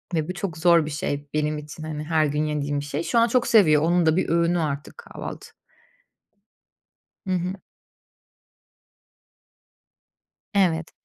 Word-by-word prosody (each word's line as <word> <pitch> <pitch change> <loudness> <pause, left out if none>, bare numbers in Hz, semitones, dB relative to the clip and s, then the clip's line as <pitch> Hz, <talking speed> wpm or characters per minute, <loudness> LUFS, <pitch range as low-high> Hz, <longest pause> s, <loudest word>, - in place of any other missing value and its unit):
ve 155 0 -1
bu - - -2
çok 185 -3 -5
zor 170 -1 +4
bir 155 - -5
şey 145 -2 -4
benim 150 0 0
için, 150 +1 -10
hani, 155 -1 -5
her 155 -1 +2
gün 150 +1 -1
yediğim 145 -1 -2
bir 145 - -6
şey. 145 +3 -3
Şu 235 - +1
an 230 - +4
çok 240 +1 +1
seviyor, 155 -10 +5
onun 175 +1 +2
da 160 0 +3
bir - - 0
öğünü 170 +1 +2
artık 145 - -4
kahvaltı. 475 - -8 1.8
Hı 190 - -1
hı. 180 +1 -2 3.0
Evet. 170 -4 +1
160 Hz, 145 wpm, -24 LUFS, 150-180 Hz, 3.0 s, seviyor